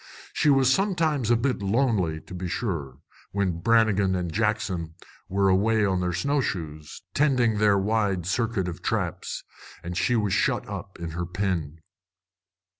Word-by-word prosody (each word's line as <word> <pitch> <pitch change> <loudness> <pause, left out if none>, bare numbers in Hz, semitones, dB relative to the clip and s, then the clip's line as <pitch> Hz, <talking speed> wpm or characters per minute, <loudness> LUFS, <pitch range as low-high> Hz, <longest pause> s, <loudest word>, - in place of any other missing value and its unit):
She 150 - +2
was 135 -2 +5
sometimes 165 - +1
a 120 - +5
bit 125 0 0
lonely, 100 -6 +1
to - - -12
be 90 0 -4
sure, 85 - -3 0.4
when 95 -4 0
Brannigan 105 -2 +3
and 90 -3 -3
Jackson 95 -6 -1 0.3
were 100 +1 +2
away 105 +3 +3
on 95 -2 +1
their 90 0 0
snow 140 - 0
shoes, 75 - -5
tending 125 -7 +2
their 105 -2 +4
wide 100 -3 0
circuit 110 -1 0
of 85 - -6
traps, - - -2 0.4
and 90 +1 -5
she 120 +7 +1
was 105 -4 +1
shut 120 +2 +1
up 100 -2 -7
in 85 -1 -5
her 85 +1 -4
pen. 85 -5 -2
100 Hz, 155 wpm, -26 LUFS, 90-115 Hz, 0.4 s, was